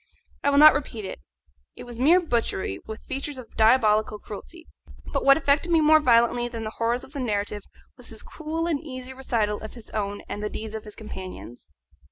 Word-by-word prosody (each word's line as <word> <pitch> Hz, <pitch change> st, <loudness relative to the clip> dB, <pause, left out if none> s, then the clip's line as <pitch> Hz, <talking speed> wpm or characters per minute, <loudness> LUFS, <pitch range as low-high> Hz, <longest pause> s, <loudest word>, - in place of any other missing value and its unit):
I -, -, +3 dB
will 280 Hz, -, +2 dB
not 305 Hz, +1 st, +10 dB
repeat 245 Hz, -7 st, -4 dB
it; -, -, -6 dB, 0.6 s
it -, -, -9 dB
was 240 Hz, -1 st, -9 dB
mere 320 Hz, +8 st, +6 dB
butchery, 230 Hz, -, -1 dB
with 220 Hz, 0 st, -8 dB
features 280 Hz, 0 st, -5 dB
of 255 Hz, -3 st, -11 dB
diabolic 220 Hz, -2 st, +4 dB, 0.2 s
cruelty; 325 Hz, -, -10 dB, 0.5 s
but -, -, 0 dB
what 275 Hz, 0 st, +7 dB
affected 305 Hz, +3 st, +1 dB
me 330 Hz, -, +5 dB
more 310 Hz, 0 st, +6 dB
violently 240 Hz, -2 st, +3 dB
than 230 Hz, -2 st, -6 dB
the 215 Hz, -, -4 dB
horrors 230 Hz, +2 st, -1 dB
of 275 Hz, -, -14 dB
the 285 Hz, -, -5 dB
narrative 205 Hz, -4 st, -2 dB, 0.4 s
was -, -, -9 dB
his -, -, -7 dB
cool 320 Hz, +1 st, -4 dB
and 315 Hz, -4 st, -1 dB
easy 255 Hz, -3 st, -7 dB
recital 225 Hz, -6 st, -1 dB
of 220 Hz, -, -8 dB
his 235 Hz, -3 st, -11 dB
own 205 Hz, -1 st, -3 dB
and 205 Hz, -, -5 dB
the 210 Hz, -, -2 dB
deeds 220 Hz, 0 st, -6 dB
of 220 Hz, 0 st, -6 dB
his 210 Hz, -, -10 dB
companions. 185 Hz, -, -9 dB
240 Hz, 205 wpm, -25 LUFS, 215-285 Hz, 0.6 s, not